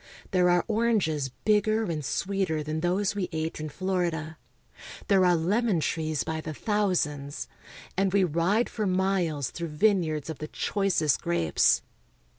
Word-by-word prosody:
There 180 -2 +3
are 175 0 +3
oranges 210 - +1 0.2
bigger 215 +1 +3
and 160 -7 -3
sweeter 185 -1 -1
than 155 +1 -3
those 185 +4 0
we 200 -3 -3
ate 160 -1 -3
in 155 0 -4
Florida. 170 -2 -2 0.7
There 195 -2 +5
are 180 -1 +5
lemon 195 +4 +1
trees 155 -1 -1
by 160 0 -3
the 155 -1 -6
thousands, 165 -10 -1 0.5
and 195 0 +1
we 200 0 +3
ride 180 +7 +1
for 215 -3 -2
miles 185 -7 0
through 170 0 -4
vine 200 +1 +4
yards 155 -3 -3
of 160 -3 -6
the 155 - -5
choicest 185 - 0
grapes. 85 -2 +2
175 Hz, 150 wpm, -27 LUFS, 155-195 Hz, 0.7 s, There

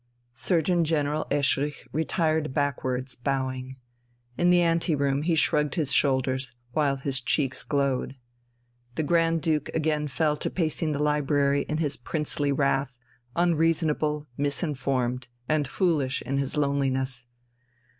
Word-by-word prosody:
Surgeon 170 +6 +1
General 155 -1 0
Eschrich 145 0 0
retired 155 -1 0
backwards, 130 -2 -1
bowing. 130 0 -3 0.6
In 175 +5 +2
the 175 0 +5
ante 165 -1 +2
room 140 0 +1
he 165 +2 +1
shrugged 150 -1 +2
his 155 -6 0
shoulders, 130 -2 +1 0.2
while 140 0 +1
his 135 -1 -1
cheeks 135 +1 0
glowed. 140 -2 -1 0.8
The 160 - 0
Grand 165 +1 +2
Duke 155 -3 0
again 155 -1 0
fell 150 +2 0
to - - -2
pacing 160 -2 -1
the 145 +1 -1
library 145 -1 +2
in 155 - 0
his 150 -3 -1
princely 145 +1 -1
wrath, 135 -2 0 0.4
unreasonable, 160 -3 +1
misinformed, 135 -4 -1 0.2
and 150 -2 +1
foolish 145 -6 0
in 140 +1 -1
his 140 +2 -2
loneliness. 135 -3 0
145 Hz, 125 wpm, -26 LUFS, 135-155 Hz, 0.8 s, the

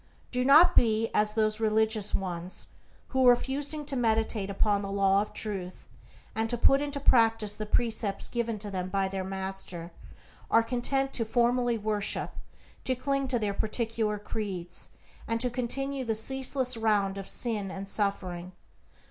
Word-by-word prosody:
Do 250 0 0
not 295 +7 +7
be 225 -1 +3
as 210 0 +1
those 215 -1 +1
religious 220 -1 +1
ones, 180 -1 -4 0.4
who, 260 -1 +4
refusing 285 +4 +1
to 280 -1 -4
meditate 220 -4 0
upon 200 +1 +1
the 195 -1 -5
Law 195 0 +3
of 210 - -5
Truth, 190 -4 -5 0.5
and 225 0 -1
to 240 - 0
put 275 +4 +4
into 285 -1 -3
practice 225 -5 +3
the 215 0 -6
precepts 220 -3 0
given 235 -2 -2
to 205 0 -5
them 185 -1 -3
by 195 0 0
their 190 0 -3
Master, 190 -3 -5 0.6
are 230 - +5
content 270 +3 0
to 230 - 0
formally 240 +1 +1
worship, 210 -1 0 0.5
to 260 - 0
cling 275 +2 -1
to 255 -2 +1
their 210 -3 -1
particular 220 0 -1
creeds, 195 -4 -5 0.4
and 230 0 0
to 250 +1 0
continue 270 +3 -2
in 255 - -6
the 225 - +1
ceaseless 260 +2 +1
round 205 -3 +1
of 195 - -4
sin 215 -5 +1
and 195 +1 -6
suffering. 185 -3 -2
220 Hz, 160 wpm, -28 LUFS, 200-245 Hz, 0.6 s, not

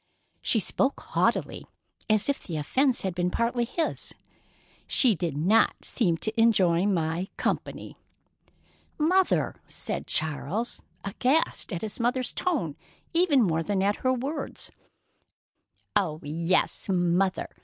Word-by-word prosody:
She 225 - +3
spoke 265 +7 +2
haughtily, - - -1 0.4
as 215 -1 +3
if 280 - 0
the 165 -4 -5
offence 255 - +1
had 190 -2 -1
been 175 0 0
partly 235 +4 0
his. 320 +7 -2 0.7
"She 250 -5 +5
did 170 -5 -3
not 195 +9 +3
seem 175 -9 +1
to 225 +1 0
enjoy 190 -5 +4
my 170 -1 0
company." - - -3 1.0
"Mother!" 365 +5 +2
said - - -5
Charles, 160 - -2 0.2
aghast 255 +8 0
at 175 0 -4
his 215 +2 -5
mother's 250 +2 0
tone 265 - -1 0.4
even 330 -7 +4
more 165 -4 +1
than 195 +2 0
at 205 +1 +1
her 255 - +1
words. 265 +5 -3 1.2
"Oh, 155 -5 +1
yes, 165 +7 0
'Mother'!" 180 +1 +1
205 Hz, 125 wpm, -27 LUFS, 170-255 Hz, 1.2 s, She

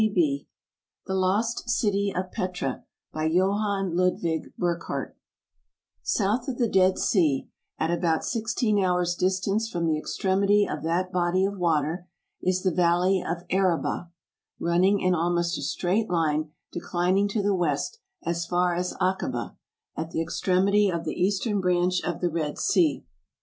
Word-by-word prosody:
ASIA 280 +7 +1 0.6
The 190 - -3
Lost 205 +6 0
City 200 -4 +1
of 185 0 -3
Petra 180 -8 -3 0.3
By 155 0 0
JOHANN 195 +1 +1
LUDWIG 175 -3 0
BURCKHARDT 170 -1 -2 0.9
SOUTH 220 +5 0
of 260 -3 -3
the 240 - +2
Dead 190 -2 +3
Sea, 155 -9 +2 0.3
at 160 +1 0
about 170 -2 +1
sixteen 225 -2 0
hours' 180 -1 +1
distance 190 +4 0
from 170 -5 -2
the 155 -2 +1
extremity 200 +4 +2
of - - -4
that 175 +3 -1
body 180 +1 +2
of 200 0 -3
water, 165 +1 0 0.3
is 185 0 0
the 185 - +2
Valley 180 +2 +3
of 170 +1 -3
Araba, 180 -2 0 0.5
running 185 +4 +3
in 185 0 +2
almost 175 0 +1
a - - -5
straight 200 +5 0
line, 155 -3 +1 0.2
declining 180 +3 +1
to 205 0 -1
the 205 0 +2
west, 175 - -1 0.2
as 170 0 -2
far 180 0 +2
as 180 +1 -2
Akaba, 185 0 -1 0.4
at 160 0 -4
the 165 - -2
extremity 195 +4 +2
of 170 -2 -2
the 155 - -2
eastern 200 +3 0
branch 180 0 +2
of 175 - -3
the 175 - +2
Red 155 -2 -2
Sea. 170 - +2
180 Hz, 150 wpm, -26 LUFS, 170-195 Hz, 0.9 s, Dead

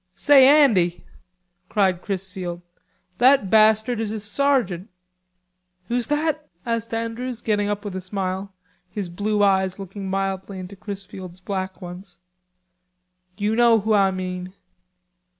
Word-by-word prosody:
"Say, 275 -2 +6 0.2
Andy," 180 -10 +2 0.7
cried 190 -4 +1
Chrisfield, 185 -3 -5 0.6
"that 250 -6 +4
bastard 220 +2 +4
is 225 -2 -2
a 220 +1 -4
sergeant." 210 -4 0 1.0
"Who's 240 0 0
that?" 300 0 -1 0.2
asked 230 -1 -2
Andrews 230 +2 -4
getting 205 -2 0
up 205 0 -3
with 200 -2 -5
a 190 - -3
smile, 190 +1 -4 0.4
his 195 -1 -5
blue 205 +4 0
eyes 190 -1 +2
looking 195 0 -7
mildly 195 0 -2
into 185 +2 -8
Chrisfield's 190 -3 -8
black 190 0 -5
ones. 180 +1 -10 1.2
"You 210 +1 0
know 235 -2 +5
who 215 +2 +1
Ah 200 -2 +4
mean." 185 0 -5
200 Hz, 125 wpm, -23 LUFS, 185-225 Hz, 1.2 s, Say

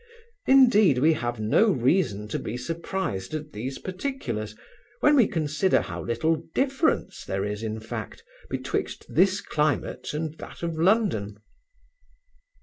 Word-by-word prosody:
Indeed, 240 - +6
we 155 +6 +4
have 120 -5 -3
no 110 - +3
reason 120 - +1
to - - -2
be 115 - -4
surprised 155 - -3
at 150 0 -6
these 130 +6 -4
particulars, 180 - -4 0.5
when 295 - +5
we 245 -7 +5
consider 160 +1 +1
how - - -6
little 140 +8 +1 0.2
difference 275 +4 0
there 95 +1 -2
is, 105 +1 -4
in 110 0 -3
fact, 110 - -7 0.3
betwixt - - -3
this 190 +1 +3
climate 150 -1 -1
and 155 +1 -3
that - - -10
of 165 -2 -2
London. 165 - +2
155 Hz, 135 wpm, -26 LUFS, -, 0.5 s, Indeed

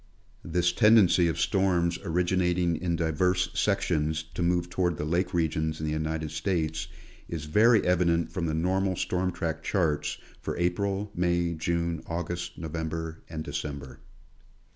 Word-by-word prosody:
This 90 +1 +1
tendency 105 -4 +5
of 80 - -2
storms 90 -3 +1
originating 90 0 +1
in 85 +1 -1
diverse 90 +3 +1
sections 80 -6 0
to 85 - -4
move 85 0 +1
toward 90 -2 0
the 75 - -3
lake 85 +4 0
regions 80 -2 0
in 80 - -3
the 75 - -1
United 80 0 -2
States, 80 -1 -1 0.4
is 80 -3 -4
very 110 +8 +4
evident 85 -2 +2
from 85 -3 -2
the 80 - -1
normal 95 +3 +1
storm 90 +1 -1
track 80 -2 -3
charts 80 -7 0 0.2
for - - -4
April, 100 +4 -1
May, 85 -1 +1
June, 85 0 -1
August, 85 +1 -4
November 80 0 -4
and 80 -1 -5
December. 70 -4 -5
85 Hz, 140 wpm, -28 LUFS, 80-90 Hz, 0.4 s, tendency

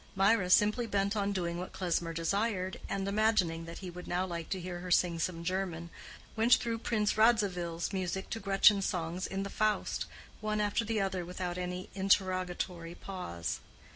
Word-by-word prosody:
Mirah, 195 -1 +3
simply 210 +5 +4
bent 200 0 +1
on 200 -1 0
doing 175 -3 -2
what 180 - -6
Klesmer 175 -2 -1
desired, 190 +3 -1
and 195 0 -1
imagining 200 -6 +2
that 165 0 -8
he 180 - -5
would 180 +1 -9
now 180 +1 0
like 170 -3 -5
to 190 - -2
hear 175 0 -5
her 180 +1 -6
sing 175 -1 +3
some 170 -1 -2
German, 170 -2 -2 0.4
went 230 +2 +6
through 230 -1 -2
Prince 215 -2 0
Radzivill's 190 -7 +2
music 190 0 -2
to 225 - -2
Gretchen's 195 0 +5
songs 175 0 -2
in 195 0 -2
the 200 - -4
Faust, 215 -1 0 0.3
one 215 0 -1
after 210 +2 +1
the 225 0 -1
other 190 -2 -1
without 180 0 -4
any 180 0 -4
interrogatory 185 -3 0
pause. 85 - -4
185 Hz, 170 wpm, -32 LUFS, 175-205 Hz, 0.4 s, went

